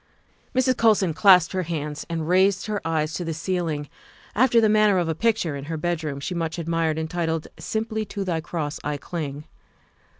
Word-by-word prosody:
Mrs. 255 -1 +2
Colson 210 -7 +3
clasped 180 -1 +6
her 185 - 0
hands 150 -3 -4
and 165 -2 -3
raised 190 +2 +3
her 210 -1 -2
eyes 160 -1 -1
to 180 - -3
the 165 -2 -3
ceiling 165 -4 -2 0.5
after 240 0 +4
the 220 - +4
manner 210 -2 +4
of 175 -2 +1
a 165 - 0
picture 180 -4 0
in 140 0 -6
her 160 +1 -4
bedroom 155 -3 -2
she 140 - -4
much 165 -1 -2
admired 165 -1 0
entitled, 160 0 -2
" - - -24
Simply 220 0 -2
to 200 0 -4
Thy 170 -4 -1
Cross 155 -2 -4
I 145 0 -2
Cling." 150 -2 -5
170 Hz, 190 wpm, -24 LUFS, 155-200 Hz, 0.5 s, clasped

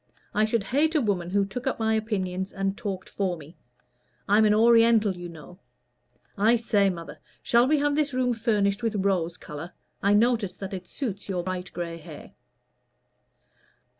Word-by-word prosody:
I 215 +1 +3
should 220 -1 0
hate 295 +10 +1
a - - +5
woman 195 -8 -1
who 200 +1 +2
took 245 +7 -6
up 265 - 0
my 220 -1 +1
opinions 190 -4 -2
and 195 0 -2
talked 195 -5 -5
for 185 -3 -2
me. 155 +2 -13 0.7
I'm 210 +2 +5
an 210 - +4
Oriental, 230 -2 +5
you 175 0 -7
know. 170 +3 -13 0.8
I 220 +4 +4
say, 210 -4 +2
mother, 170 -3 -7 0.2
shall 240 +1 +4
we 305 +2 +3
have 290 0 +1
this 300 -1 +1
room 255 -1 +1
furnished 210 -3 0
with 225 -2 -1
rose 175 -3 0
color? 150 +4 -8 0.3
I 200 +1 +3
notice 220 -4 +2
that 195 0 -7
it 185 -1 -6
suits 205 -6 -5
your 180 -2 -1
bright 185 0 -4
gray 170 -1 -5
hair." 160 - -11
200 Hz, 170 wpm, -26 LUFS, 185-230 Hz, 0.8 s, a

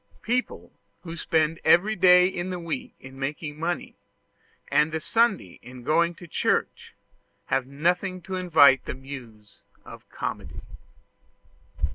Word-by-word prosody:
People 245 +2 -2 0.3
who 165 -2 -8
spend 160 -1 0
every 205 +6 +4
day 180 -1 +6
in 185 -1 -3
the 180 - -3
week 165 -6 -5
in 130 +1 -12
making 150 +2 -5
money, 170 +2 -3 0.8
and 150 +2 +3
the 160 - -2
Sunday 215 - 0
in 125 0 -12
going 170 +4 +2
to 175 - -12
church, - - -1 0.5
have 135 -1 -1
nothing 180 +6 -1
to 190 +1 -7
invite 160 -8 +5
the - - -5
muse 120 -6 -11 0.3
of - - -13
Comedy. - - -6
165 Hz, 130 wpm, -25 LUFS, 135-180 Hz, 0.8 s, day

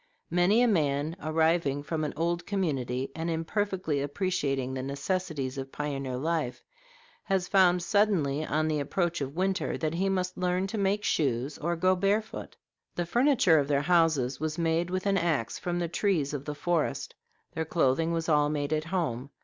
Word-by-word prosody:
Many 180 +7 +4
a - - +4
man 150 -5 +1
arriving 155 -2 +1
from 155 +1 -2
an 150 - -1
old 170 +1 -1
community, 135 -10 -1
and 165 +1 -3
imperfectly 165 -2 -1
appreciating 140 -4 -1
the 130 - -3
necessities 140 -1 -3
of 135 0 -6
pioneer 135 -3 -3
life, 150 -4 -2 0.6
has 190 -3 0
found 180 -2 +4
suddenly, 175 -8 +2
on 155 0 0
the 155 -1 0
approach 170 +3 -1
of 140 +1 -4
winter, 190 +2 0
that 155 -1 -2
he 190 +3 0
must 185 -1 -1
learn 180 +1 +1
to 195 +3 -4
make 200 +1 +1
shoes 135 - 0
or 170 +3 -1
go 185 +3 +3
barefoot. 205 +4 -1 0.4
The 175 - -1
furniture 240 - +4
of 140 - 0
their 140 -1 +2
houses 155 -7 +2
was 155 0 -2
made 165 +1 +1
with 185 +1 -2
an 195 -1 +2
axe 155 -10 -1
from 175 -1 -2
the 175 -1 -1
trees 170 -5 0
of 140 -1 -4
the 150 - -4
forest. 165 +1 -1 0.4
Their 160 - -2
clothing 160 0 +1
was 165 -1 -1
all 150 -2 +3
made 145 0 -1
at 155 0 -1
home. 155 -8 -2
165 Hz, 175 wpm, -28 LUFS, 145-185 Hz, 0.6 s, Many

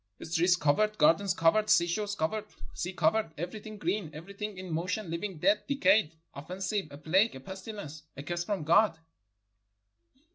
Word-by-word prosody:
streets 175 +2 +3
covered, 210 +7 +1
gardens 170 +4 +4
covered, 210 +6 +3
seashore 175 +2 +3
covered, 210 +7 -1 0.3
sea 180 - -3
covered, 175 +2 +1
every 175 +7 -5
thing 215 0 -9
green, 180 -1 -2
everything 200 +5 -7
in 185 -2 -6
motion; 180 +3 -2
living, 175 +2 -4
dead, 200 +6 +3
decayed, 205 - +3 0.2
offensive; 185 +5 -3
a 140 - -10
plague, 185 +9 +2
a - - -7
pestilence, 190 -1 -8 0.2
a 140 - -6
curse 175 +3 -3
from 195 -3 -2
God!" 170 +3 +4
185 Hz, 150 wpm, -30 LUFS, 165-210 Hz, 0.3 s, gardens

